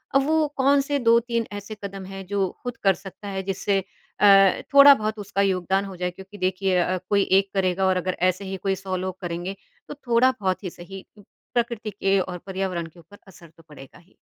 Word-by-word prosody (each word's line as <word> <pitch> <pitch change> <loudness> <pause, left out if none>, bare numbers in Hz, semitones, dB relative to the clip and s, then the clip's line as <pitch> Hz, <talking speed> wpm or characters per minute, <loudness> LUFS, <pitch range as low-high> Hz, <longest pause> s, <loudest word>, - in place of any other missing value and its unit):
अब 275 - +4
वो 315 0 +2
कौन-से 280 +1 +2
2-3 235 -1 +2
ऐसे 205 +1 -7
कदम 195 -1 -6
हैं 195 0 -8
जो 195 -1 0
ख़ुद 245 -1 -5
कर 195 -1 +5
सकता 195 +2 -11
है 190 -1 -4
जिससे 195 +1 -1
अ, 195 0 +3
थोड़ा-बहुत 275 -7 +7
उसका 200 0 -2
योगदान 190 0 +1
हो 190 -1 -8
जाए। 180 0 -2
क्योंकि 190 +3 -13
देखिए 185 0 0
अ, 185 +1 +1
कोई 200 -1 +3 0.2
एक 195 0 -4
करेगा 190 -1 +1
और 185 -1 +2
अगर 185 0 -2
ऐसे 185 +2 -4
ही 190 0 -5
कोई 195 +1 -1
सौ 190 0 -5
लोग 185 0 -5
करेंगे 175 +2 -4 0.3
तो - - -7
थोड़ा-बहुत 240 -7 +1
ही 185 - -3
सही 190 +3 -11
प्रकृति 230 +1 -4
के 195 -1 +1
और 180 -1 -3
पर्यावरण 185 -3 -3
के 165 +2 -18
ऊपर 205 +5 -17
असर 170 -3 -16
तो 165 - -18
पड़ेगा 135 +1 -14
ही। 175 +2 -26
195 Hz, 200 wpm, -24 LUFS, 185-215 Hz, 0.3 s, थोड़ा-बहुत